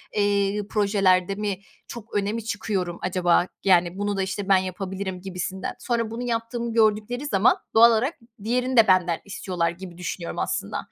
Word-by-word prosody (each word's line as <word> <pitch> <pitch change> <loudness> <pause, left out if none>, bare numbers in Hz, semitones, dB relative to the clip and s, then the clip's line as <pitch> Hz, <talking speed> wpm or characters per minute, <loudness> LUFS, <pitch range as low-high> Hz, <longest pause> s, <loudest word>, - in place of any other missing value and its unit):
eee, 205 0 +1
projelerde 195 -3 +2
mi 205 -2 -3 0.3
çok 230 -2 -10
öne 205 0 0
mi 230 0 -4
çıkıyorum 200 -5 -3
acaba? 180 -1 +2 0.2
Yani, 175 -1 +3
"Bunu 205 0 -1
da, - - 0
işte, 190 +1 -4
ben 195 - +7
yapabilirim." 185 0 -4
gibisinden. 190 0 -4
Sonra 230 -3 -1
bunu 235 +2 -4
yaptığımı 235 0 -2
gördükleri 220 +4 +1
zaman 240 -2 +3 0.2
doğal 230 +1 +8
olarak 240 +7 +1 0.3
diğerini 250 +3 0
de 225 - +7
benden 180 -3 +3
istiyorlar 180 -4 -2
gibi 175 0 -10
düşünüyorum, 175 -1 -5
aslında. - - -2
200 Hz, 160 wpm, -24 LUFS, 185-225 Hz, 0.3 s, doğal